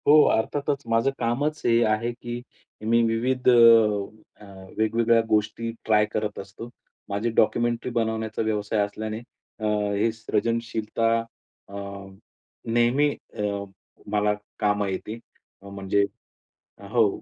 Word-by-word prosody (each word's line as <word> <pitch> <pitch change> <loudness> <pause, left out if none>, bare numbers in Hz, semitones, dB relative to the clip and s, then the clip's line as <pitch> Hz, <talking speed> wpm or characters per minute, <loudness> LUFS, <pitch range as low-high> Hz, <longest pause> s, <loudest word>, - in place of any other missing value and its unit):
हो, 150 +1 +8
अर्थातच 140 +5 -1
माझं 115 +4 +2
कामच 140 +6 -1
हे 115 0 +4
आहे, 110 +2 0
की 120 0 -6 0.4
मी 115 +2 +3
विविध 125 +3 -1
अ, 110 -4 +4
अ, - - -11 0.3
वेगवेगळ्या 115 +1 +3
गोष्टी 110 +2 0
ट्राय 105 -1 +4
करत 105 -1 -2
असतो. 100 +4 -9 0.4
माझी 100 +4 -1
डॉक्युमेंटरी 120 +2 +1
बनवण्याचा 110 -1 -1
व्यवसाय 105 -1 -1
असल्याने 110 +1 -5 0.4
अ, 110 - -3 0.3
हे 110 +3 +2
सृजनशीलता 115 0 -1
अ, 115 -3 -14 0.9
नेहमी 120 +5 +3 0.3
अ, - - -3 0.7
मला 105 0 +2 0.3
कामं 105 -1 +1
येते. 105 +4 -5 0.4
अ, 100 - -11
म्हणजे 100 0 0 0.7
अ, 100 - -12
हो, 115 -3 +4
115 Hz, 120 wpm, -25 LUFS, 105-120 Hz, 0.9 s, हो